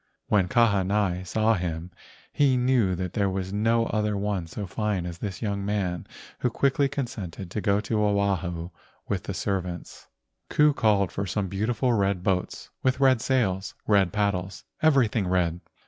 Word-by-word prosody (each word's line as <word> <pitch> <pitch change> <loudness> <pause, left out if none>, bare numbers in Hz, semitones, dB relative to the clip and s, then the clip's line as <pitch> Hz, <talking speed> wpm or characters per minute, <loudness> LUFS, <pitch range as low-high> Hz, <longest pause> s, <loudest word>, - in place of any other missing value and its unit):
When 95 -3 +3
Kahanai 100 -4 +2
saw 110 +5 +2
him 85 -2 -3 0.4
he 135 -3 +3
knew 125 -7 +2
that 90 0 -4
there 100 -3 +1
was 95 0 -3
no 115 +2 +2
other 105 -2 0
one 100 -4 -2
so 100 +5 -5
fine 100 -1 -2
as 85 -1 -6
this 100 -2 -5
young 100 -2 -1
man 100 -4 -2 0.3
who 125 - +1
quickly 140 +3 +1
consented 100 - -5
to 105 - -2
go 100 -1 +2
to 105 0 0
Oahu 95 -4 0 0.4
with - - -3
his - - -3
servants. 90 -3 -4 0.4
Ku 150 0 +4
called 105 -7 +2
for 100 0 -3
some 100 0 -2
beautiful 115 +6 0
red 100 -4 +1
boats 90 -2 -2
with 130 0 +1
red 130 -4 +4
sails, 100 -8 0
red 100 -4 +3
paddles,—everything 105 - 0
red. 90 -2 +1
100 Hz, 155 wpm, -26 LUFS, 95-110 Hz, 0.4 s, Ku